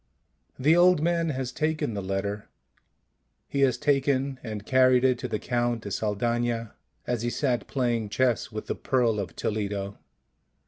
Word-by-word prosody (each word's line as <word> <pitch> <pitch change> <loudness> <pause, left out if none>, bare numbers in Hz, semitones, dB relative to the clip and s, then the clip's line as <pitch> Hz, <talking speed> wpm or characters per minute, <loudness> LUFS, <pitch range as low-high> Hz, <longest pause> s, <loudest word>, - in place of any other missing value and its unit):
The 150 +5 +4
old 180 -1 +5
man 170 +1 +1
has 130 -3 -3
taken 155 -3 -1
the 100 - -3
letter, 95 +2 -3 1.0
he 140 - -3
has 130 -3 +3
taken 135 -1 +1
and 105 -3 -6
carried 130 0 +4
it 130 -2 +3
to - - -3
the - - -2
Count 120 -1 -1
de 100 - -6
Saldana, 115 +2 -1 0.3
as 120 -2 -1
he 120 - -1
sat 120 -4 -1
playing 120 -5 -1
chess 120 +2 +1
with 110 0 -5
the - - -2
Pearl 120 -5 +1
of 100 - -5
Toledo. 100 -2 -3
120 Hz, 155 wpm, -27 LUFS, 110-135 Hz, 1.0 s, old